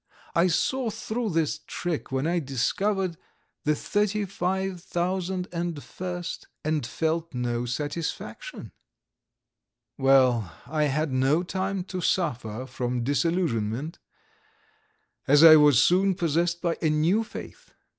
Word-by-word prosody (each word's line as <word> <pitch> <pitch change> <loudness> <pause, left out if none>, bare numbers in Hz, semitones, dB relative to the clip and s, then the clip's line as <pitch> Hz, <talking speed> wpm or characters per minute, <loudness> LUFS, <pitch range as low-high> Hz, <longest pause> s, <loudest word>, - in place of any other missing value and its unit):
I 170 +2 +4
saw 245 +8 0
through 225 +1 -3
this 160 -3 0
trick 175 -6 -3
when 135 +2 0
I 175 +2 +1
discovered 180 - -1 0.5
the 150 0 +3
35,001 185 -3 -2
st 180 -1 -5 0.2
and 155 -5 -1
felt 160 +2 -2
no 120 0 -1
satisfaction. 155 - -5 1.3
Well, 130 -8 +4
I 150 +3 0
had 150 +1 0
no 135 +6 +2
time 190 +1 -2
to 185 0 -5
suffer 125 - -1
from 125 -1 -3
disillusionment, 145 - -1 1.3
as 145 +3 +6
I 160 -1 +11
was 145 -5 +6
soon 190 +2 +3
possessed 170 0 0
by 170 -1 0
a 160 - +2
new 165 +9 +2
faith. 225 - -10
165 Hz, 110 wpm, -26 LUFS, 135-185 Hz, 1.3 s, I